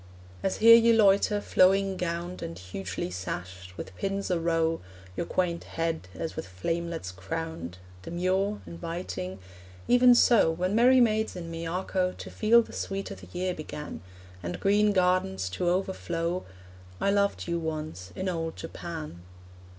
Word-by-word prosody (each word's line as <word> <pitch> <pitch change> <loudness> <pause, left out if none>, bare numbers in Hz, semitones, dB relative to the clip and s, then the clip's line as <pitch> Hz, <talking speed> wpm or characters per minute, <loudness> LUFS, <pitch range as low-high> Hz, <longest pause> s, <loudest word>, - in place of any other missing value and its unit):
As 195 - -1
here 230 +1 +9
you 230 0 +6
loiter, 205 -1 +4
flowing 195 0 +3
gowned 175 0 -3
And 85 +1 -6
hugely 90 0 -5
sashed, 90 0 -6
with 95 - -7
pins 195 - -2
a 175 - +2
row 165 -1 +1 0.3
Your 170 - -3
quaint 170 -2 -1
head 165 - -3
as 165 - -4
with - - -5
flamelets 165 - -3
crowned, 95 - -5 0.2
Demure, 185 - -1
inviting 165 - -5 0.5
even 245 0 +7
so, 235 -7 +5
When 180 +4 -1
merry 250 +4 +6
maids 220 -2 +2
in 170 -2 -6
Miyako 180 +2 -1
To - - -8
feel 230 +2 +5
the - - -13
sweet 195 0 -4
o' - - -5
the 95 -1 -13
year 185 - -1
began, 150 - -7 0.4
And 90 0 -4
green 205 +1 +3
gardens 180 - +1
to 175 - -1
overflow, 175 -1 -1 0.5
I 200 - +2
loved 200 -2 +1
you 170 0 0
once 155 - -5
in 185 - -3
old 165 -2 -2
Japan. 160 - -7
170 Hz, 150 wpm, -28 LUFS, 155-195 Hz, 0.5 s, here